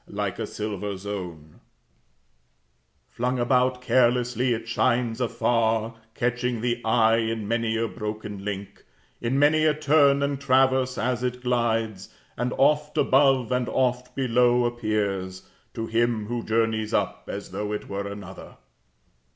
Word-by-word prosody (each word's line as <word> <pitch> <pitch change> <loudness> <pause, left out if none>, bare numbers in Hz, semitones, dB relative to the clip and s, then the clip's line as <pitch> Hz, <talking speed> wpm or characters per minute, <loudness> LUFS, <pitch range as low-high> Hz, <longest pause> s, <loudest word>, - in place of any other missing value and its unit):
Like - - -4
a - - -3
silver 105 -2 -4
zone 90 -6 -7 1.5
"Flung 125 +2 -2
about 125 +1 +1
carelessly, 125 0 +2
it 115 0 -2
shines 120 0 0
afar, 115 -1 +1 0.2
Catching 125 -1 -1
the 120 0 -1
eye 115 0 +3
in 110 -2 -2
many 115 0 0
a 115 +1 0
broken 105 -2 -6
link, 100 -1 -6 0.4
In 120 +3 0
many 150 +2 +4
a 155 -1 +3
turn 140 -2 +4
and 140 -1 -2
traverse, 130 -1 +2
as 125 +1 -1
it 125 0 -3
glides. 115 -5 -1 0.2
And 125 +1 -2
oft 150 +2 +2
above, 135 -3 +3
and 125 -1 0
oft 125 -1 -1
below, 125 -1 +3
appears 105 -5 -2 0.3
to 115 - -3
him 115 -1 0
who 120 +2 -3
journeys 110 -1 0
up - - -1
As - - -7
though 105 0 -3
it 105 - -4
were 100 0 -4
another." 100 -2 -9
120 Hz, 135 wpm, -25 LUFS, 110-125 Hz, 1.5 s, many